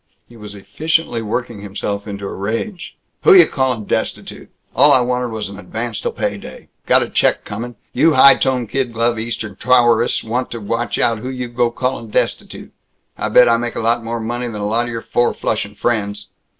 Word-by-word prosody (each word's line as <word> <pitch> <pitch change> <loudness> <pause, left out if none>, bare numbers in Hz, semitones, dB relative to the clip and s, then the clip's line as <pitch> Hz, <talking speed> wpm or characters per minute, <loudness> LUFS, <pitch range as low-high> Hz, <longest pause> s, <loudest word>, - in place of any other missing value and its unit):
He 120 - -17
was 105 -2 -10
efficiently 120 +6 -1
working 115 0 -4
himself 100 +1 -4
into 100 -1 -6
a - - -5
rage. 115 - -4 0.2
"Who 410 - +7
you 365 - +9
calling 130 -5 -1
destitute? - - -3 0.3
All 145 +3 +6
I 130 - +5
wanted 125 0 -1
was 110 -3 -4
an 100 0 -10
advance 110 +1 -5
till - - -2
pay - - -2
day! - - -12 0.2
Got - - +4
a - - -4
check - - +1
coming. 120 +4 -6 0.2
You 165 - +4
high 135 +1 +8
tone, 130 -2 0
kid 125 +1 -2
glove 115 0 0
Eastern 110 -3 -5
towerists 120 -1 +3
want 120 +3 -2
to 115 - -6
watch 115 +3 -2
out 115 -2 +1
who 125 +4 -5
you 125 -1 -4
go 120 0 +1
calling 125 -1 -3
destitute. - - -2 0.4
I 105 - -3
bet 125 +3 +6
I 115 0 +4
make 120 0 -4
a - - -2
lot 115 +1 +1
more 115 +1 -3
money 120 +2 -3
than 110 -3 -6
a - - -2
lot 115 +3 0
of - - -5
your 115 -1 -5
four 120 - +1
flushin' 105 -1 -2
friends!" 105 -3 -2
115 Hz, 205 wpm, -18 LUFS, 105-125 Hz, 0.4 s, you